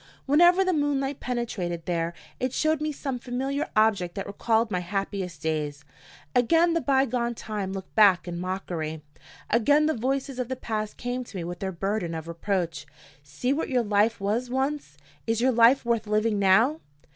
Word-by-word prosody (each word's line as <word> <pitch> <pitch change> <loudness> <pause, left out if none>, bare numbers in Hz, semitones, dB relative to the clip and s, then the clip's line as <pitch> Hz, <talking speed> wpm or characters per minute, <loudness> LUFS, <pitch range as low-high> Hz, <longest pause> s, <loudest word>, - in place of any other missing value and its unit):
Whenever 345 +6 +5
the 370 - +2
moonlight 285 -2 0
penetrated 195 -9 -3
there, 170 -1 -1 0.2
it 255 0 -1
showed 310 +1 +1
me 305 0 -1
some 270 -3 -4
familiar 265 +4 -2
object 210 -5 +2
that 195 - -4
recalled 220 +2 0
my 180 - 0
happiest 190 0 -4
days. 150 -2 -2 0.5
Again 330 +8 +4
the 335 - +1
by 270 -2 +3
gone 240 -2 -1
time 210 -4 -4
looked 190 -1 -7
back 200 -5 +5
in 170 -1 -4
mockery. 170 -4 -4 0.5
Again 285 +7 +4
the 315 - +2
voices 265 +2 -2
of 250 - -1
the 260 - -3
past 215 -3 -4
came 245 +1 -3
to 205 - -9
me 175 - -3
with 175 +1 -6
their 190 -1 -3
burden 185 -1 -2
of 160 0 -6
reproach: 170 -3 -2 0.3
See 150 - -2
what 305 - -2
your 250 -3 +2
life 210 +1 +2
was 220 +5 -1
once! 265 - -2 0.3
Is 225 0 +1
your 260 +2 +3
life 235 +2 +5
worth 230 -2 0
living 210 0 +1
now? 225 +11 +4
225 Hz, 180 wpm, -26 LUFS, 185-265 Hz, 0.5 s, Whenever